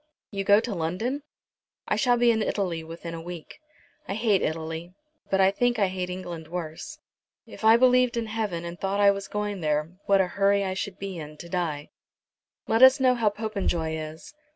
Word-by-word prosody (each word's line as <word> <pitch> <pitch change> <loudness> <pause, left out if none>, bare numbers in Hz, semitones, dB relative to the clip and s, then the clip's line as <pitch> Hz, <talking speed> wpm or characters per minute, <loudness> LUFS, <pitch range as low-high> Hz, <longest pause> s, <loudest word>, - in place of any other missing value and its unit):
"You 195 -2 -2
go 205 +1 +6
to 235 -2 -4
London?" 185 - -2 0.7
"I - - +1
shall 245 -2 +3
be 240 0 +5
in 220 -1 0
Italy 180 -6 -1
within 165 +1 -8
a 165 - -6
week. 170 -2 -9 0.5
I 195 - -3
hate 215 -3 +2
Italy, 160 +2 -4 0.3
but 195 - +1
I 190 0 +5
think 245 +4 +1
I 200 -3 +2
hate 185 -1 -4
England 175 -3 -6
worse. 175 - -6 0.5
If - - -12
I 220 +1 +7
believed 250 -1 +4
in 230 - -1
heaven 215 -6 -3
and 170 +1 -7
thought 195 +1 -1
I 200 0 +6
were 200 0 -3
going 205 -2 -3
there, 150 +1 0 0.2
what 200 -1 +5
a 190 - +4
hurry 200 +2 +2
I 190 -1 -2
should 190 0 -4
be 195 -3 -6
in 150 0 -9
to 170 - -10
die." 165 -5 -3 0.8
"Let 225 - +2
us 260 +2 +8
know 255 -1 +4
how 230 -4 +2
Popenjoy 200 -7 -2
is." 155 - -8
195 Hz, 200 wpm, -26 LUFS, 170-220 Hz, 0.8 s, us